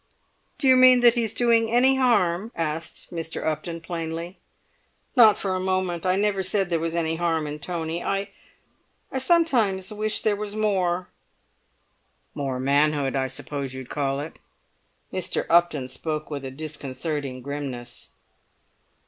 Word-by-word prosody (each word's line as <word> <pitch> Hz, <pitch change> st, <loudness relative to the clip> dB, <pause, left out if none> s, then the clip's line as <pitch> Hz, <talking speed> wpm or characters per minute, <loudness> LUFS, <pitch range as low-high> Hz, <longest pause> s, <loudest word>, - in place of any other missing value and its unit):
"Do 285 Hz, -, 0 dB
you 260 Hz, -, +7 dB
mean 255 Hz, -1 st, +7 dB
that 240 Hz, -1 st, +7 dB
he's 230 Hz, -3 st, 0 dB
doing 230 Hz, -1 st, +3 dB
any 255 Hz, +3 st, +4 dB
harm?" 220 Hz, -5 st, +2 dB
asked 160 Hz, 0 st, -4 dB
Mr. 165 Hz, -1 st, -5 dB
Upton 160 Hz, +2 st, -3 dB
plainly. 165 Hz, +1 st, -5 dB, 0.8 s
"Not 220 Hz, -5 st, +7 dB
for 190 Hz, -2 st, -2 dB
a 185 Hz, -, -1 dB
moment. 185 Hz, -1 st, -1 dB
I 185 Hz, -, +3 dB
never 200 Hz, -1 st, +1 dB
said 190 Hz, 0 st, -1 dB
there 165 Hz, -, +2 dB
was 165 Hz, +1 st, -2 dB
any 165 Hz, -1 st, 0 dB
harm 165 Hz, -2 st, 0 dB
in 150 Hz, 0 st, -5 dB
Tony. 165 Hz, +2 st, -4 dB
I—I 195 Hz, +6 st, -7 dB
sometimes 245 Hz, -, +2 dB
wish 215 Hz, +1 st, 0 dB
there 210 Hz, -1 st, +2 dB
was 210 Hz, 0 st, -5 dB
more!" 185 Hz, -4 st, 0 dB, 1.2 s
"More 135 Hz, -3 st, -3 dB
manhood, 140 Hz, 0 st, +2 dB
I 135 Hz, -1 st, 0 dB
suppose 135 Hz, 0 st, -5 dB
you'd 130 Hz, -2 st, -8 dB
call 140 Hz, -2 st, -1 dB
it?" 150 Hz, +3 st, -7 dB, 0.7 s
Mr. -, -, -1 dB
Upton 165 Hz, -6 st, +3 dB
spoke 155 Hz, +4 st, -4 dB
with 140 Hz, -2 st, -4 dB
a -, -, -4 dB
disconcerting 140 Hz, -2 st, -4 dB
grimness. 130 Hz, -4 st, -6 dB
170 Hz, 140 wpm, -25 LUFS, 145-205 Hz, 1.2 s, you